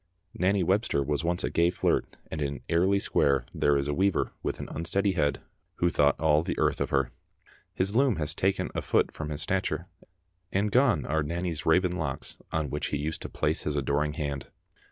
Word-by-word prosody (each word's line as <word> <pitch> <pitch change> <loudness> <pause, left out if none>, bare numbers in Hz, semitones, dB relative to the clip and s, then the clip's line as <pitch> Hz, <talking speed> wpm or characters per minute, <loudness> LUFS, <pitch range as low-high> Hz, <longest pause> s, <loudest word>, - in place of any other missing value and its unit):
Nanny 95 +1 +2
Webster 95 -5 +1
was 75 +2 -1
once 85 +1 0
a - - -1
gay 85 +1 +3
flirt, 90 - 0
and 80 - -3
in 70 -1 -2
Airlie 95 +4 +3
Square 70 -8 +2
there 75 -1 +3
is 70 0 -1
a 75 - 0
weaver 95 +4 +1
with - - -3
an - - -5
unsteady 95 +5 0
head 75 -6 0 0.3
who 85 0 +1
thought 70 -2 +3
all 75 -1 +4
the 85 - -3
earth - - +1
of - - 0
her. 70 -3 +1 0.6
His 95 +3 0
loom 130 -2 +4
has 75 -3 -1
taken 95 +1 0
a - - -2
foot - - +2
from 80 -1 -5
his 75 0 -2
stature, 95 +3 -1 0.7
and 100 +2 +1
gone 125 +2 +3
are 80 +1 +1
Nanny's 85 +1 -3
raven 90 +3 +4
locks 80 -7 -4
on 80 -3 -1
which - - -2
he 75 - -1
used 75 +2 -3
to - - -5
place - - 0
his 75 - -2
adoring 75 +1 0
hand. 70 -4 -4
80 Hz, 200 wpm, -28 LUFS, 75-95 Hz, 0.7 s, all